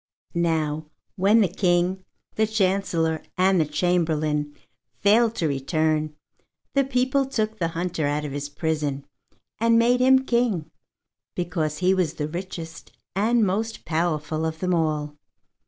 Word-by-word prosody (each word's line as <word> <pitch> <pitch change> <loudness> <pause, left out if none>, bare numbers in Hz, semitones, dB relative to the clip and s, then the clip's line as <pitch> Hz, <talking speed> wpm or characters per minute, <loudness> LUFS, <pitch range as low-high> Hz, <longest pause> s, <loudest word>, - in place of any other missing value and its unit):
Now 160 -3 0 0.3
when 205 +3 +4
the 200 - +4
King, 180 +1 +1 0.3
the 220 0 +1
Chancellor, 185 -6 0 0.2
and 185 -1 +4
the 155 - 0
Chamberlain 155 -3 0 0.4
failed 225 +3 +4
to 165 - 0
return, 155 +2 0 0.6
the 275 - +3
people 260 +1 +1
took 220 -4 -2
the 170 - +1
hunter 170 -4 -1
out 150 +1 -1
of 145 - -5
his 145 +1 -4
prison 145 -2 -2 0.5
and 230 +1 +4
made 240 +2 +4
him 260 +1 +5
king, 225 -11 0 0.6
because 160 -3 -2
he 185 +1 +3
was 180 -5 0
the 150 - -2
richest 165 -1 -7 0.2
and 220 +3 +3
most 220 +4 -2
powerful 155 -2 -1
of 160 0 -2
them 180 +2 -1
all. 150 -3 -1
175 Hz, 140 wpm, -24 LUFS, 155-210 Hz, 0.6 s, him